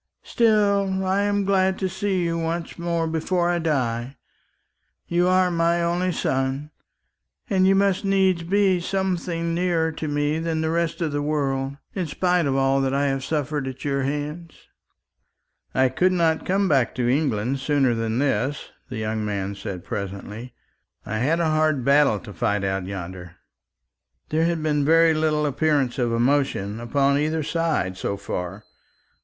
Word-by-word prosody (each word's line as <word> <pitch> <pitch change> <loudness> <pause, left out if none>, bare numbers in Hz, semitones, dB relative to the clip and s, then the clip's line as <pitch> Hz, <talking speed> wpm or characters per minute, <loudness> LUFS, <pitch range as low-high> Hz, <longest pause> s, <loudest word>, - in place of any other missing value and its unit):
Still, 200 -4 +2
I 190 +2 +1
am 205 -1 +1
glad 190 -1 +2
to 190 - -1
see 190 0 -1
you 170 0 -1
once 165 +1 -3
more 170 -1 -1
before 170 +2 0
I 175 - 0
die. 130 -5 -1 0.9
You 175 +1 +2
are 185 0 +3
my 170 0 +1
only 175 +2 0
son, 135 -1 -1 0.8
and 190 -4 +3
you 195 - +5
must 195 0 +2
needs 190 -3 +2
be 190 +1 +2
something 175 -2 -2
nearer 170 -2 +1
to 155 0 -5
me 145 +1 0
than 165 -1 -1
the 160 0 0
rest 170 0 -1
of 160 -3 0
the 145 0 -1
world, 140 -2 -1 0.2
in 185 -4 -2
spite 180 +1 +1
of 135 - 0
all 135 0 +2
that 135 0 0
I 140 0 +2
have 135 -1 -2
suffered 150 -1 -2
at 130 +1 -7
your 140 -1 0
hands." 150 +4 -4 1.2
"I 130 0 +4
could 180 +8 +2
not 165 -3 +1
come 195 +1 +2
back 135 -8 +2
to 125 -2 0
England 130 -2 0
sooner 135 -3 +2
than 115 0 -2
this," 135 +1 -1 0.2
the - - -5
young 110 0 -2
man 100 -1 -2
said 95 -3 -6
presently. 105 +5 -6 0.5
"I 110 +1 -3
had 155 +8 +1
a 170 - +1
hard 155 -4 +1
battle 140 -5 +4
to 105 - -10
fight 100 +3 0
out 95 -1 -2
yonder." 90 -2 -7 0.9
There 160 +2 +1
had 170 -2 -1
been 150 -2 +1
very 165 +2 +5
little 155 -1 +1
appearance 140 -3 +1
of 120 -2 +1
emotion 115 -4 0
upon 140 +4 +1
either 155 +1 0
side 160 - -1
so 100 - -3
far. 100 0 -5
150 Hz, 165 wpm, -23 LUFS, 130-170 Hz, 1.2 s, you